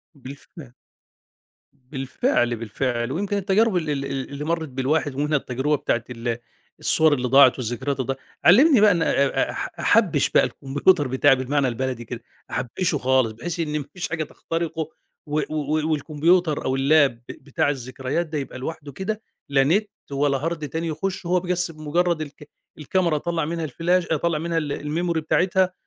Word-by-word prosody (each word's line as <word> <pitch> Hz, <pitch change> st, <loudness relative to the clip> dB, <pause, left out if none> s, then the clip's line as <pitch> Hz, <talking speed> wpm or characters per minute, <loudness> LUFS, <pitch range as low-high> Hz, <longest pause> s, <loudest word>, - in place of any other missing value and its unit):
بالفعل. 135 Hz, 0 st, -12 dB, 1.2 s
بالفعل، 135 Hz, -, 0 dB
بالفعل، 120 Hz, +2 st, -2 dB
ويمكن 200 Hz, +6 st, -1 dB
التجارب 200 Hz, +1 st, +2 dB
ال 160 Hz, -3 st, -2 dB
ال 140 Hz, -2 st, -1 dB
ال 135 Hz, -1 st, -4 dB
اللي 140 Hz, +1 st, -6 dB
مرّت 165 Hz, 0 st, -1 dB
بالواحد 135 Hz, +2 st, -1 dB
ومنها 150 Hz, +2 st, +1 dB
التجربة 135 Hz, +3 st, -1 dB
بتاعة 120 Hz, -4 st, -1 dB
ال 120 Hz, -1 st, -3 dB, 0.4 s
الصوَر 160 Hz, -1 st, +3 dB
اللي 125 Hz, -3 st, 0 dB
ضاعت 135 Hz, 0 st, +6 dB
والذكريات 130 Hz, +3 st, -3 dB
اللي 130 Hz, -, -2 dB
ضاع -, -, -16 dB, 0.3 s
علّمني 250 Hz, -, +7 dB
بقى 210 Hz, -1 st, +7 dB
إن 170 Hz, -3 st, +1 dB
أ -, -, +2 dB, 0.4 s
أ -, -, -2 dB
أح -, -, -4 dB
أحبّش -, -, +3 dB
بقى -, -, +4 dB
الكمبيوتر 145 Hz, +3 st, +1 dB
بتاعي 130 Hz, +1 st, +4 dB
بالمعنى 135 Hz, +2 st, 0 dB
البلدي 125 Hz, -1 st, -3 dB
كده، 120 Hz, +1 st, -7 dB, 0.3 s
أحبّشه 145 Hz, +6 st, -1 dB
خالص 130 Hz, -3 st, +2 dB
بحيث 160 Hz, +10 st, -5 dB
إن 150 Hz, -2 st, -1 dB
ما 145 Hz, -, -6 dB
فيش 180 Hz, -1 st, -4 dB
حاجة 160 Hz, -1 st, -2 dB
تخترقه، 165 Hz, 0 st, -4 dB, 0.4 s
و 150 Hz, +1 st, 0 dB
و 155 Hz, +1 st, -1 dB
والكمبيوتر 155 Hz, +2 st, +1 dB
أو 130 Hz, 0 st, 0 dB
الLap 140 Hz, +1 st, +4 dB
ب 115 Hz, -1 st, -20 dB
بتاع 140 Hz, +1 st, -2 dB
الذكريات 130 Hz, +4 st, -3 dB
ده 155 Hz, -1 st, -4 dB
يبقى 135 Hz, -2 st, -5 dB
لوحده 145 Hz, +1 st, -6 dB
كده، 210 Hz, +9 st, -4 dB, 0.3 s
لا 135 Hz, -1 st, +4 dB
نت 200 Hz, +9 st, +2 dB, 0.2 s
ولا 140 Hz, 0 st, +1 dB
Hard 160 Hz, -3 st, -4 dB
تاني 165 Hz, +3 st, -3 dB
يخشه 185 Hz, +4 st, -3 dB
هو 180 Hz, +1 st, +3 dB
بس 180 Hz, -1 st, -1 dB
بمجرّد 165 Hz, +2 st, 0 dB
الك 150 Hz, 0 st, -9 dB, 0.3 s
الكاميرا 170 Hz, +2 st, 0 dB
أطلّع 165 Hz, +1 st, -1 dB
منها 165 Hz, +1 st, -3 dB
الفلاش 170 Hz, +5 st, 0 dB
أطلّع 160 Hz, 0 st, +1 dB
منها 165 Hz, +1 st, -2 dB
ال 150 Hz, -3 st, -2 dB
الmemory 165 Hz, +3 st, -1 dB
بتاعتها، 185 Hz, +3 st, +1 dB
150 Hz, 170 wpm, -23 LUFS, 135-170 Hz, 1.2 s, علّمني